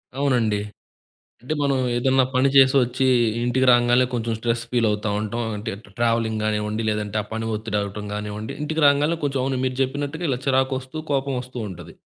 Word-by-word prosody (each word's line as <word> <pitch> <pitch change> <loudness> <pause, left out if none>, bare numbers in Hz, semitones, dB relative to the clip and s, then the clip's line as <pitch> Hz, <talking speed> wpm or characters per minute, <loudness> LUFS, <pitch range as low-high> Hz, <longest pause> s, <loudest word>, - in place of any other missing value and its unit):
అవునండి. 120 -7 +1 0.8
అంటే 130 +6 -3
మనం, 140 -2 +2 0.2
ఏదన్నా 130 +1 +3
పని 135 +2 +4
చేసొచ్చి 130 -1 +4 0.4
ఇంటికి 125 +2 +1
రాంగాల్నే, 120 +1 +4
కొంచెం 115 -1 -1
స్ట్రెస్ 115 0 -1
ఫీలవుతా 110 -3 +1
ఉంటాం. 110 +3 -3 0.2
అంటే 110 +2 -4
ట 100 - -19
ట్రావెలింగ్ 115 -2 +1
గానివ్వండి, 105 +1 -1
లేదంటే 105 0 -2
ఆ - - -14
పని 110 0 -3
ఒత్తిడవ్వటం 105 -1 -3
గానివ్వండి, 105 +1 -5
ఇంటికి 155 +1 -1
రాంగాల్నే 145 +4 +3
కొంచెం 135 -1 -1
అవును 130 -1 -1
మీరు 130 0 -2
జెప్పినట్టుగా 145 +5 -2
ఇలా 125 - -1
చిరాకొస్తూ, 130 +2 0
కోపమోస్తూ 130 -2 -2
ఉంటది. 90 - -10
120 Hz, 155 wpm, -23 LUFS, 110-135 Hz, 0.8 s, పని